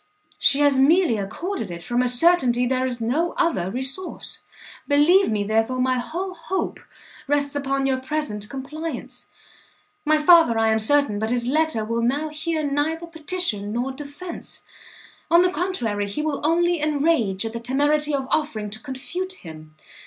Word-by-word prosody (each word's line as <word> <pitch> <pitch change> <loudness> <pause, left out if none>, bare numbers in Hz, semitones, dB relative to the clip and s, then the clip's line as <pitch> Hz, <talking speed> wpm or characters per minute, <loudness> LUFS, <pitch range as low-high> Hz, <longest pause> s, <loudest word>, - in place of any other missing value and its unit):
"She 280 +1 +4
has 285 -2 +4
merely 310 - +4
accorded 225 - -4
it 170 -1 -7
from 245 0 0
a 250 - +1
certainty 250 -2 +4
there 255 +1 0
is 245 -2 -3
no 300 +10 0
other 330 - +1
resource. 265 - -2 0.5
Believe 310 - +4
me, 210 -2 0
therefore, 225 +4 0
my 255 0 +1
whole 360 +9 -4
hope 375 +1 -4 0.5
rests 285 0 0
upon 275 -1 -1
your 265 -1 +1
present 260 -8 -3
compliance. 305 +4 -7 0.8
My 310 0 +3
father, 305 -6 +5
I 225 0 +3
am 220 - +2
certain, 255 -2 +2
by 220 - -1
his 240 +1 -1
letter, 290 -4 0
will 230 +1 -1
now 280 +6 0
hear 315 +1 -3
neither 300 +4 -1
petition 320 - -2
nor 245 +4 -2
defence; 295 +6 -8 0.7
on 340 +1 +6
the 365 - +2
contrary, 245 - -2
he 200 +10 -4
will 305 -2 -2
only 345 +1 +2
enrage 285 -10 +1
at 225 - -4
the 235 - -4
temerity 290 +4 +1
of 270 -1 -2
offering 220 -9 -1
to 220 - -6
confute 320 +9 -5
him. 155 -2 -11
280 Hz, 160 wpm, -23 LUFS, 235-315 Hz, 0.8 s, on